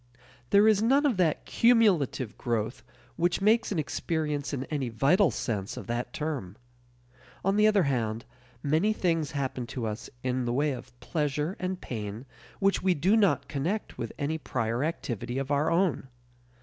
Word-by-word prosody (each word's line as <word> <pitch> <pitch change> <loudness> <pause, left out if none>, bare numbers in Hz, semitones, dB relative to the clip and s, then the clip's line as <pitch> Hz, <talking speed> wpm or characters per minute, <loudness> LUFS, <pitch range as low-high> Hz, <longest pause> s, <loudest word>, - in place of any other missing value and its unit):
There 205 +2 +6
is 215 -2 +4
none 270 +6 +4
of 255 -9 +2
that 170 -5 +1
cumulative 195 - +3
growth 115 -1 -2 0.4
which 175 +1 +1
makes 220 +3 +3
an 195 - -1
experience 150 -1 -2
in 135 -3 -2
any 135 -3 -3
vital 145 - +3
sense 105 -4 -3
of - - -6
that 120 +1 -3
term. 140 - -4 0.9
On 195 +1 +3
the 210 +1 +5
other 210 -3 +4
hand, 115 -5 -1 0.4
many 160 +9 +2
things 165 -7 0
happen 130 -3 -3
to 120 -1 -4
us 105 -1 -5
in 130 -1 -1
the 120 - -1
way 145 +3 +1
of 125 -1 -9
pleasure 150 +2 -1
and 185 0 -3
pain 110 +1 -5 0.3
which 195 0 +2
we 185 -1 +2
do 185 +9 +3
not 180 - +3
connect 170 +10 -3
with 115 - -3
any 155 +3 -2
prior 120 -2 -1
activity 120 - -3
of 135 +1 -2
our 145 +2 +2
own. 170 -5 +1
150 Hz, 165 wpm, -28 LUFS, 125-185 Hz, 0.9 s, There